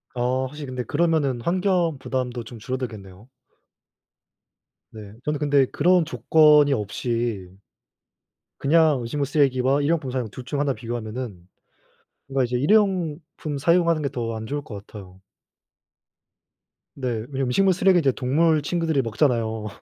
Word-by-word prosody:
아 125 +2 0
확실히 150 +2 -8
근데 125 -1 -4
그러면은 150 -5 0
환경 175 -1 +1
부담도 125 -2 -3
좀 115 +1 -11
줄어들겠네요. 110 -4 -7 1.6
네. 105 -2 -11
저는 150 0 -1
근데 145 -2 +3
그런 180 +6 +3
조건이 150 +2 +4
없이 110 -2 -2 1.1
그냥 155 -1 +3
음식물 140 +5 -2
쓰레기와 135 -1 +2
1 145 - 0
회용품 155 -6 0
사용 125 -3 -2
둘 125 - -9
중 145 0 -3
하나 140 -2 +1
비교하면은 115 -6 -6 0.8
그러니까 135 -1 +1
이제 125 - -1
1 145 +8 0
회용품 170 -7 0
사용하는 170 +1 +2
게 140 - -1
더 115 -2 -4
안 110 0 -6
좋을 145 +2 -3
것 100 -5 -10
같아요. 95 -3 -12 1.8
네. 130 -2 -4 0.2
왜냐면 135 -1 -2
음식물 190 +9 +3
쓰레기 185 0 +4
이제 140 -4 +2
동물 150 +5 +2
친구들이 160 -2 0
먹잖아요. 115 -2 0
135 Hz, 305 characters per minute, -23 LUFS, 120-155 Hz, 1.8 s, 조건이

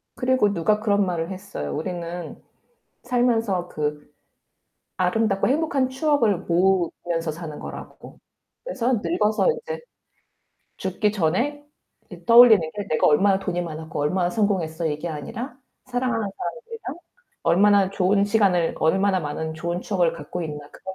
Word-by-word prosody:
그리고 250 -5 +2
누가 210 +4 +1
그런 205 -2 +2
말을 170 -2 -2
했어요. 185 - -5
우리는 175 - -5 0.6
살면서 230 -7 +1
그 150 0 -4 0.8
아름답고 195 +2 +1
행복한 280 -2 +1
추억을 260 - +1
모으면서 175 -2 0
사는 155 -2 -7
거라고. - - -10 0.5
그래서 260 - 0
늙어서 210 - +1
인제 480 0 -5 1.0
죽기 190 +3 0
전에 225 - -1 0.4
이제 - - -13
떠올리는 235 -2 +8 0.2
게 205 -1 -4
'내가 155 - +2
얼마나 190 +6 +4
돈이 180 -2 -2
많았고 160 -2 -6
얼마나 175 +5 +1
성공했어.' 180 -6 0
이게 155 +3 -3
아니라' 215 - -6 0.3
사랑하는 245 -4 -1
사람들이랑 460 - -6 0.5
얼마나 195 +3 +4
좋은 200 +1 +2
시간을, 200 -5 +2
얼마나 190 +4 +2
많은 160 +1 -4
좋은 170 +2 -3
추억을 180 -4 +1
갖고 165 +2 -6
있나.' 150 -2 -7
그런 190 0 -9
190 Hz, 320 characters per minute, -23 LUFS, 170-225 Hz, 1.0 s, 떠올리는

